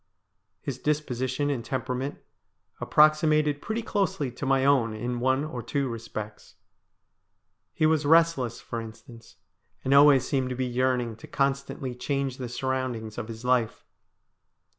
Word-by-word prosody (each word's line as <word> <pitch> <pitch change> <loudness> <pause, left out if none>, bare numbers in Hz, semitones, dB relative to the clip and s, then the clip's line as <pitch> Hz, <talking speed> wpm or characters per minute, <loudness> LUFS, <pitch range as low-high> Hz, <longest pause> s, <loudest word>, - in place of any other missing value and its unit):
His 130 -3 -4
disposition 145 -1 -1
and 125 -5 -3
temperament 130 +2 -3 0.6
approxi 155 +1 +4
mated 150 -1 +2
pretty 220 +1 -3
closely 190 - -1
to 130 +3 -5
my 135 0 +3
own 125 -6 +3
in 120 +2 -3
one 130 +3 +2
or 140 -6 -5
two 140 +4 -1
respects. 110 -3 -7 1.2
He 155 - 0
was 155 -1 +3
restless, 155 -6 +3
for 115 - -5
instance, 115 +1 -12 0.5
and 135 - +1
always 140 -2 +6
seemed 130 -2 0
to 125 - -3
be 130 +1 -1
yearning 125 -2 0
to - - -12
constantly 135 -1 -1
change 135 +1 -2
the 125 -3 -5
surroundings 125 -3 -3
of 115 - -5
his 115 +1 -8
life. 125 -3 +1
130 Hz, 140 wpm, -27 LUFS, 120-145 Hz, 1.2 s, always